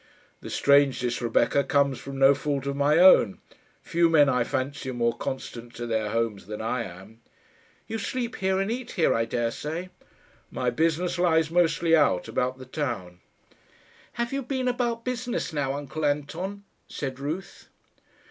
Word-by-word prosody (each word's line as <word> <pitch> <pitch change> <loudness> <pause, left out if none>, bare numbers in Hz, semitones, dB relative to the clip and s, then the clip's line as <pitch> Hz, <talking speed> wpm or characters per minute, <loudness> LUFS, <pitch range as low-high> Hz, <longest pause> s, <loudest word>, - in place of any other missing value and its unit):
"The - - -9
strangeness, 135 -4 +3
Rebecca, 120 +4 +2
comes 140 -1 +1
from 135 +2 -7
no 135 +1 +6
fault 140 -1 -2
of 140 0 -2
my 145 +2 +3
own. 175 - +6 0.5
Few 170 0 +2
men, 150 -4 +5
I 125 -2 +2
fancy, 130 +2 -3
are 130 - -4
more 115 -1 +1
constant 120 -2 -6
to 120 - -5
their 110 -2 -1
homes 110 -4 -2
than 105 0 -6
I 115 +2 -1
am." 95 +5 -12 0.6
"You 225 0 -4
sleep 240 +3 -3
here 190 -1 +1
and 195 +3 -1
eat 250 +1 -5
here, 165 - +3
I 115 0 +1
daresay." 150 +10 -3 0.6
"My 125 -1 -1
business 165 +6 0
lies 160 -3 +3
mostly 165 -1 +3
out, 95 - +2
about 130 +1 -1
the 130 - -10
town." 115 - -4 0.9
"Have 235 +2 -3
you 275 - -1
been 260 0 -2
about 240 -2 -1
business 245 -7 -3
now, 140 -2 -1
uncle 145 +2 -5
Anton?" 160 +8 -2 0.2
said 135 -2 -5
Ruth. 155 +7 -6
140 Hz, 160 wpm, -26 LUFS, 125-175 Hz, 0.9 s, no